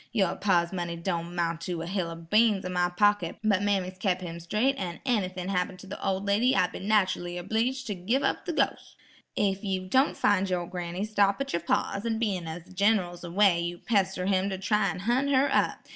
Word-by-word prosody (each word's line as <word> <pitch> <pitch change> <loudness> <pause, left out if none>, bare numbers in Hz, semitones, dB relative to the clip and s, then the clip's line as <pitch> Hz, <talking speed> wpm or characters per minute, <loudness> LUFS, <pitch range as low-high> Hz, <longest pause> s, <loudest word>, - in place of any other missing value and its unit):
Yer 195 -6 +1
pa's 175 -3 +1
money 175 -2 -3
don' 170 0 -3
'mount 170 -1 -1
to 170 -1 -3
a - - -5
hill 180 -1 -2
o' 165 - -6
beans 200 +5 +2
in 185 - -3
my 175 0 +2
pocket, 205 -1 +1
but 205 -3 +2
mammy's 190 -2 -1
kep' 185 -2 +1
him 170 -2 -6
straigh, 210 +10 +1
an' 180 -10 -5
ennythin'd 185 -6 -1
happen 180 0 -1
the 195 0 -8
ol' 190 -1 0
lady 220 +6 +2
I'd 180 - +2
be - - -7
nachally 185 -4 +1
obleeged 225 +8 -1
to 210 - -2
giv' 210 +9 -1
up - - -1
the 340 - -1
ghos'." - - -1 0.4
"Ef 195 -1 0
you 190 -2 -2
don' 265 +9 +3
fin' 195 -1 +2
your 180 -2 -1
granny, 180 +2 -4
stop 205 -2 +2
at 275 0 -3
yer 170 - +1
pa's 200 +4 -1
an' 230 -1 -1
bein' 195 -7 -1
as 160 +1 -6
the 180 - -17
Gin'ral's 185 -3 +1
away 175 0 +3
yer 175 0 -3
pester 190 -3 0
him 190 0 +1
to 190 - -3
try 205 +1 +1
an' 180 - -5
hunt 245 +7 +1
her 275 0 +3
up. - - 0
190 Hz, 220 wpm, -28 LUFS, 175-210 Hz, 0.4 s, don